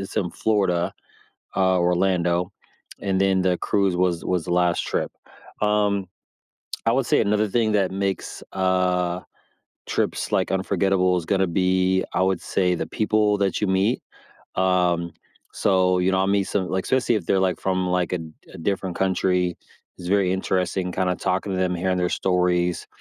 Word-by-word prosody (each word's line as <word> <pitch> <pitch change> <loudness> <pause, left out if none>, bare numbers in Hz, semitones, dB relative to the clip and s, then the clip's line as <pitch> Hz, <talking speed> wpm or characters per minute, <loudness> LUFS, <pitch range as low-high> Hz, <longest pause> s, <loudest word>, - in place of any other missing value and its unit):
it's 95 - -7
in 90 -4 0
Florida, 95 -5 0 0.6
uh, 95 -1 +3
Orlando. 90 0 +1 0.5
And 95 -1 0
then 95 -1 +3
the 90 -1 +1
cruise 100 -3 +1
was 90 -2 0
was 90 -3 -1
the 90 - -1
last 90 -1 +2
trip. - - -2 0.5
Um, 105 -2 +1 0.8
I 115 - +4
would 130 0 +1
say - - +3
another 105 0 +1
thing 110 +1 +1
that 100 -3 +2
makes, 100 0 -3
uh, 90 -1 +1 0.7
trips, - - -2
like, - - +1
unforgettable 95 -1 +1
is 80 - -6
gonna 95 -1 +2
be, 95 +1 +2
I - - +2
would 95 -1 +1
say, 90 -2 0
the - - -3
people 105 -2 +1
that 100 -2 0
you 105 - +1
meet. 95 +6 +1 0.5
Um, 90 -2 +1 0.4
so, 90 -1 +2
you 90 +1 +2
know, 95 - +2
I 95 - +2
meet 100 0 +2
some 95 -2 -2
Like, 95 0 -1
especially 125 -2 +1
if 95 - -3
they're, 95 - +2
like, 95 -2 0
from, 95 -1 0
like, 90 -1 0
a 90 - 0
d 80 -1 -8 0.2
a - - -9
different 95 0 -2
country, 90 -1 +1 0.4
it's 90 -1 -7
very 95 -2 +2
interesting 95 -1 -1
kinda 90 -1 0
talking 95 +1 -1
to 95 - -2
them, 90 -1 0
hearing 90 +1 0
their 90 0 +1
stories. 90 -1 0
95 Hz, 170 wpm, -23 LUFS, 90-95 Hz, 0.8 s, I